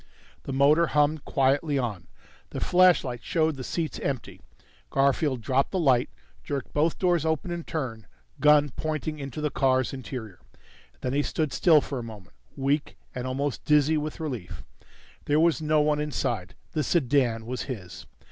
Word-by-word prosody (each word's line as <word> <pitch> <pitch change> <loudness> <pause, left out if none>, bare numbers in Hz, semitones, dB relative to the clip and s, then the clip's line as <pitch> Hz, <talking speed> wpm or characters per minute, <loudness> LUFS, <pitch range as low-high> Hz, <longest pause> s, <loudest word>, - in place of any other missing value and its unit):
The - - -4
motor 145 +5 +4
hummed 150 0 +1
quietly 140 +2 +1
on. 105 -9 -3 0.4
The - - -5
flashlight 175 -9 +3
showed 160 -2 +1
the 130 - -7
seats 160 +3 -3
empty. 135 -4 -4 0.5
Garfield 135 - +1
dropped 135 +3 +1
the 190 - -2
light, 130 -8 +3 0.3
jerked 135 - -4
both 155 +2 +1
doors 175 -4 +2
open 160 +2 -1
in 170 -1 -4
turn, 120 -11 -5 0.3
gun 150 0 +5
pointing 155 0 -3
into 140 +1 -6
the 150 -1 -1
car's 130 -1 +1
interior. 125 -7 -7 0.6
Then 125 - -2
he 145 - +2
stood 155 -1 -2
still 160 -4 +5
for 135 -2 -5
a - - -5
moment, 105 - -11 0.2
weak 140 +2 -1 0.2
and 125 0 -4
almost 135 +1 -2
dizzy 150 +1 +3
with 150 +1 -3
relief. 100 - -5 0.6
There 150 +1 +2
was 160 -3 +3
no 155 0 +3
one 150 0 +2
inside. 150 -1 -2 0.2
The 155 - -1
sedan 130 -7 +1
was 125 +2 -4
his. 95 -9 -7
140 Hz, 160 wpm, -26 LUFS, 130-155 Hz, 0.6 s, gun